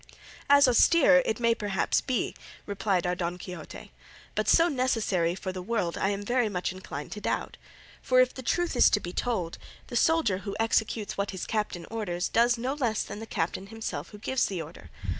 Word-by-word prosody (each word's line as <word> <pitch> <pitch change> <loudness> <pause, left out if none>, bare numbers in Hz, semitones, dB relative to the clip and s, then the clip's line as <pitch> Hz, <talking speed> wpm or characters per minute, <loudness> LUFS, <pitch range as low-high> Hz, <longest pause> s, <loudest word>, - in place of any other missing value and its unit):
"As 285 -1 +7
austere 270 +2 +6
it 220 - -1
may 235 -1 +3
perhaps 205 -4 0
be," 255 -3 -1 0.3
replied 200 -3 0
our 180 - +1
Don 175 -1 -3
Quixote, 180 -3 -9 0.4
"but - - -1
so 335 - +6
necessary 225 - 0
for 190 0 -4
the 185 0 -6
world 185 -4 -1
I 195 - 0
am 205 0 -3
very 240 0 +1
much 180 -2 -2
inclined 175 -6 -7
to 210 - -6
doubt. - - -2 0.5
For, 255 0 +3
if 255 0 +4
the 260 - -7
truth 350 +5 0
is 245 - +6
to 210 - +2
be 175 -2 -7
told, 185 -9 -2 0.3
the - - -6
soldier 240 - +3
who 200 0 -6
executes 220 -2 0
what 200 - 0
his 190 -2 -5
captain 210 -6 -2
orders 185 -6 -2
does 235 +1 +3
no 250 +3 -2
less 240 -7 0
than 205 - -7
the 225 - -8
captain 185 +1 -2
himself 195 -8 -5
who 210 - -11
gives 260 +5 0
the 190 -3 -4
order. 160 +1 -9
210 Hz, 195 wpm, -28 LUFS, 185-245 Hz, 0.5 s, As